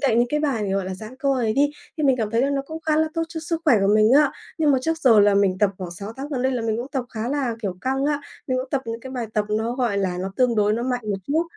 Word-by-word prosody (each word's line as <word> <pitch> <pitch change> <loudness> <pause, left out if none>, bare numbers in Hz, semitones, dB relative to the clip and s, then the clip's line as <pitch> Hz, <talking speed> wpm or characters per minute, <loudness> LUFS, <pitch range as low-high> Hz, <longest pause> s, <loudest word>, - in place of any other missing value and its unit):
cạnh 250 -5 +2
những 240 - +3
cái 300 +3 0
bài, 235 -9 0
gọi 195 -1 0
là, 185 0 -4
dãn 215 +6 -10
cơ 275 +1 -1
ấy 235 -4 0
đi, 285 +4 +3 0.3
thì 310 - -3
mình 265 -2 +4
cảm 220 -4 -2
thấy 230 +1 +1
là 275 - +1
nó 275 -1 0
cũng 320 +3 -8
khá 310 -1 +1
là 315 0 +2
tốt 330 - 0
cho 325 -1 -6
sức 330 +1 -3
khỏe 290 -7 +6
của 195 +1 +3
mình 215 +3 +5
á. 290 -2 +4 0.3
Nhưng 310 -2 +3
mà 270 - +4
trước 325 +3 0
giờ 240 -9 +6
là 205 0 +5
mình 195 -2 +2
tập 205 -1 +3
khoảng 180 -2 -5
6 200 +5 -7
tháng 275 +2 -5
gần 265 -4 -2
đây 260 +1 +1
là 245 -3 -2
mình 220 -1 0
cũng 240 +3 -4
tập 265 -4 -1
khá 225 0 -4
là, 270 -4 -1
kiểu, 190 -3 -2
căng 270 +1 -1
á, 290 0 0 0.3
mình 255 -1 0
cũng 255 0 -5
tập 275 -2 0
những 230 0 -4
cái 260 - -9
bài 245 -3 -3
tập 210 - +1
nó, 220 +2 0
gọi 240 -6 0
là, 185 -2 -1
nó 190 +1 -4
tương 250 -2 +3
đối 210 0 +3
nó 230 +2 -1
mạnh 250 0 -1
một 200 - 0
chút 315 +3 +2
250 Hz, 330 wpm, -23 LUFS, 215-280 Hz, 0.3 s, khỏe